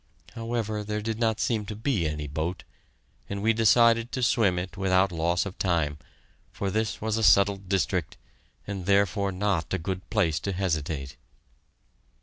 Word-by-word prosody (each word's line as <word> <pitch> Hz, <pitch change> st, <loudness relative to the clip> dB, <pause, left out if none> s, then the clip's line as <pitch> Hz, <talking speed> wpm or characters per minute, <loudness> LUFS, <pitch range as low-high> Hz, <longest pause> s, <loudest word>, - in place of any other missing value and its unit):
However, 115 Hz, -2 st, -3 dB
there 105 Hz, 0 st, -3 dB
did 110 Hz, 0 st, -3 dB
not 110 Hz, -2 st, +1 dB
seem 110 Hz, -3 st, 0 dB
to 105 Hz, -, -5 dB
be 110 Hz, -, 0 dB
any 75 Hz, -1 st, -4 dB
boat, 80 Hz, +5 st, -3 dB, 0.7 s
and 100 Hz, -, -3 dB
we 115 Hz, +1 st, +4 dB
decided 115 Hz, +1 st, +4 dB
to 130 Hz, -, -1 dB
swim 105 Hz, -6 st, +3 dB
it 90 Hz, 0 st, -4 dB
without 95 Hz, -1 st, +2 dB
loss 85 Hz, +2 st, 0 dB
of 100 Hz, -, -8 dB
time, 80 Hz, -5 st, 0 dB, 0.5 s
for 100 Hz, -1 st, -3 dB
this 110 Hz, +1 st, -1 dB
was 110 Hz, 0 st, -1 dB
a 110 Hz, -, -1 dB
settled 100 Hz, -2 st, +4 dB
district, 95 Hz, -4 st, 0 dB, 0.5 s
and 100 Hz, -3 st, -5 dB
therefore 100 Hz, 0 st, +2 dB
not 95 Hz, -2 st, -1 dB
a -, -, 0 dB
good 95 Hz, +2 st, -5 dB
place 90 Hz, -8 st, +1 dB
to 100 Hz, -, -3 dB
hesitate. 80 Hz, -7 st, -2 dB
100 Hz, 160 wpm, -27 LUFS, 90-110 Hz, 0.7 s, we